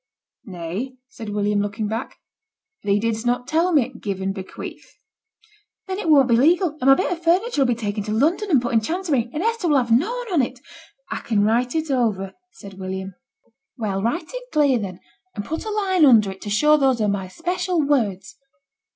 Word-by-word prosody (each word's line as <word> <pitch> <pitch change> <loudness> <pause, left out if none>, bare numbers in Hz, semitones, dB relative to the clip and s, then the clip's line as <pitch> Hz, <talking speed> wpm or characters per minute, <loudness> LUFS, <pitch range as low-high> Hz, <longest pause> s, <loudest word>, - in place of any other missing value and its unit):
'Nay,' 190 +7 -5
said 225 -3 -8
William, 205 0 0
looking 205 +1 -3
back. 225 +4 -5 0.6
'Thee 200 0 +1
didst 225 0 -1
not 245 0 0
tell 330 +5 +2
me 270 -5 +2
"give 195 -2 -3
and 195 0 -2
bequeath!"' 190 -1 -9 0.9
'Then 380 0 -4
it 400 - -2
won't 280 -4 +6
be 235 - +4
legal, 335 +9 +4
and 255 - +1
my 270 - +9
bit 370 - -1
o' - - +1
furniture 345 - +1
'll - - +1
be 245 - +1
taken 210 -2 -3
to 215 - -3
London, 320 - +1
and 275 -8 +3
put 240 - -2
into 220 -1 +2
chancery, 320 -9 -1
and 305 +6 -3
Hester 460 -4 0
will 295 -3 +4
have 240 -3 0
noane 450 - +1
on 315 - +4
it.' 250 +1 -3 0.5
'I - - -2
can 210 -3 0
write 240 +5 +1
it 315 -2 -1
over,' 215 -7 0 0.2
said 195 - -12
William. 190 0 -5 0.6
'Well, 200 -4 -2
write 305 - -2
it - - -8
clear 285 -5 +3
then, 190 -3 -6 0.3
and 205 -2 -4
put 320 +6 -4
a - - -3
line 390 -5 +1
under 225 -8 +6
it 190 - -12
to 205 - -6
show 300 +9 +4
those 265 -4 +2
are 215 - +1
my 200 -2 -1
special 355 - -2
words. 220 -11 0
245 Hz, 205 wpm, -22 LUFS, 205-320 Hz, 0.9 s, my